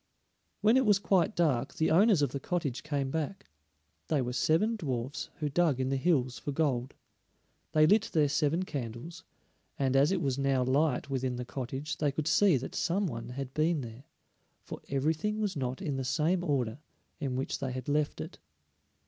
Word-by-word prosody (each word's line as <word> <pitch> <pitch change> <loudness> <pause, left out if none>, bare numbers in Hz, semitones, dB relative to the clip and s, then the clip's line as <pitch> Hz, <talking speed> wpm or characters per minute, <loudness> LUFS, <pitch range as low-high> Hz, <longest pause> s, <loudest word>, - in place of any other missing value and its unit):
When 220 +4 +5
it 260 - +3
was 205 -2 +6
quite 195 0 +1
dark 150 -9 +1
the 160 - +1
owners 195 -2 +5
of 140 - +1
the 140 - -3
cottage 145 -6 -2
came 140 -2 -2
back; 160 +5 -3 0.6
they 155 - +1
were 125 -1 -2
seven 170 - +2
dwarfs 135 - -4
who 155 -3 -2
dug 150 -2 +2
in 130 0 0
the 135 - +1
hills 130 -4 +1
for 145 - -4
gold. 135 -4 -1 0.8
They 155 -1 +6
lit 210 +6 +3
their 150 -3 +3
seven 150 +4 +1
candles, 140 +4 -6 0.5
and 135 -1 +1
as 140 +4 +4
it 190 - +1
was 140 -4 -1
now 135 -2 +2
light 140 +1 +1
within 130 -1 -1
the 125 0 -5
cottage 135 +3 -5
they 145 -2 +1
could 150 +2 -3
see 190 -4 +4
that 130 - -6
some 195 +4 0
one 115 -7 -5
had 130 +1 -6
been 155 0 +1
there, 120 +2 -9 0.6
for - - -8
everything 160 +10 0
was 205 -3 -1
not 130 +3 -3
in 145 -6 -2
the 135 - -2
same 165 +7 +1
order 135 -6 -1 0.4
in 135 -4 -2
which 130 +1 -2
they 135 -2 -3
had 130 0 -6
left 145 0 0
it. - - -8
145 Hz, 190 wpm, -30 LUFS, 130-170 Hz, 0.8 s, was